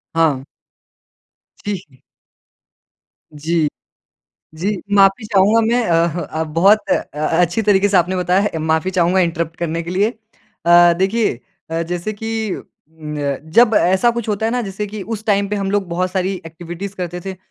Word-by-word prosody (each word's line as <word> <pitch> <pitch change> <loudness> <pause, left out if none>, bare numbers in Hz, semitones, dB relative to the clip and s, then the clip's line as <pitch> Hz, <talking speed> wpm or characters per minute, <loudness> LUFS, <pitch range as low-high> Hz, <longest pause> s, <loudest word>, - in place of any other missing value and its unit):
हाँ। 155 -5 +2 1.2
ठीक 200 -3 -3
है। 130 - -21 1.4
जी। 155 +1 0 0.9
जी 175 +5 -2 0.3
माफ़ी 195 +2 +4
चाहूँगा 210 +2 +4
मैं 235 +2 +2
अह, 170 0 +1
अ, 155 +1 -4
बहुत 170 +7 +4
अ, - - +5 0.5
अच्छी 175 +5 +1
तरीके 205 -1 +3
से 200 - +2
आपने 180 +1 +2
बताया 180 +1 +2
है। 205 - +1
अ, 165 - -5
माफ़ी 160 +3 0
चाहूँगा 180 0 +2
इन्टरप्ट 170 -2 -1
करने 170 0 -2
के 170 - -7
लिए। 200 +4 +1
अ, 175 -6 +2
देखिए 205 - +1 0.4
अ, 165 +1 -1
जैसे 175 +5 -3
कि 220 0 -3
अ, - - -9 0.3
जब 155 - +1
ऐसा 190 +7 +3
कुछ 235 -1 -4
होता 210 +1 0
है 225 - -1
ना 250 - 0
जैसे 205 0 -4
कि 210 0 -7
उस 220 +1 -5
टाइम 200 -1 +2
पे 210 - -2
हम 195 -1 -2
लोग 200 -2 0
बहुत 180 +2 -1
सारी 190 0 -1
एक्टिविटीज़ 175 +4 -7
करते 180 -1 -4
थे 190 -1 -5
185 Hz, 170 wpm, -18 LUFS, 170-205 Hz, 1.4 s, अ